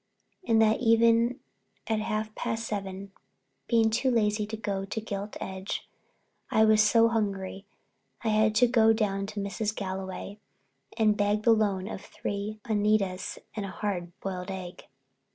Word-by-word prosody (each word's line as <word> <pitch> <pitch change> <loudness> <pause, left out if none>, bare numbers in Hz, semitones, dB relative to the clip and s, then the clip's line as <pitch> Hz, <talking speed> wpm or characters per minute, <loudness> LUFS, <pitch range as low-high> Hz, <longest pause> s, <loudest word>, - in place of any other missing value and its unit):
And 225 -1 +4
that 220 0 +3
evening 230 +1 +4 0.4
at 220 -1 0
half 215 0 -2
past 225 +1 -3
seven, 195 -2 -5 0.6
being 225 -2 +3
too 245 +4 +1
lazy 210 -3 +1
to 220 +1 -5
go 200 -3 -2
to 195 +3 -4
the 220 - -11
Gilt 205 -1 -5
Edge, 190 0 -5 0.6
I 220 - +4
was 215 0 +5
so 230 +2 +5
hungry 200 -3 -2 0.6
I 225 - +1
had 215 0 +3
to 245 +3 +5
go 225 -2 +5
down 200 -3 -1
to 205 0 -5
Mrs. 205 +2 -2
Galway 190 +1 -5 0.6
and 215 -2 +4
beg 210 +1 +1
the 230 - +6
loan 200 -3 0
of 210 - -6
three 205 +2 -5
Uneedas 210 -4 0 0.2
and 210 - -3
a 195 - -4
hard 185 -3 -3
boiled 185 -1 -4
egg. 185 -2 -7
210 Hz, 155 wpm, -28 LUFS, 195-220 Hz, 0.6 s, the